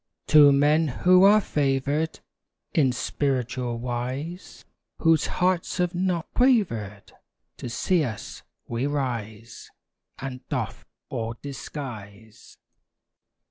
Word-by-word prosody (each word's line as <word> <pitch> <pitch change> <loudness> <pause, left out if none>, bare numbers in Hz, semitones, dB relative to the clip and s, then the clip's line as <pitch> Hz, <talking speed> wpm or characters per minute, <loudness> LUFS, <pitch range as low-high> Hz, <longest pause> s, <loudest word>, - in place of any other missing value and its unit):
To 150 -2 +8
men 150 +3 +3
who 180 +7 +4
are 210 +2 +7
favored 145 -1 -1 0.5
In 135 -5 +3
spiritual 125 -2 -2
wise, 125 +9 -5 0.3
Whose 165 -2 +3
hearts 180 -1 0
have 180 0 0
not 180 -2 -1
quavered 115 - +1 0.5
To 125 - -6
see 160 +8 +1
us, 115 -6 -6 0.3
we 120 +4 -2
rise 115 -6 -4 0.5
And 130 -1 -6
doff - - -4 0.2
all 115 0 -4
disguise. 110 -7 -9
140 Hz, 100 wpm, -25 LUFS, 120-165 Hz, 0.5 s, To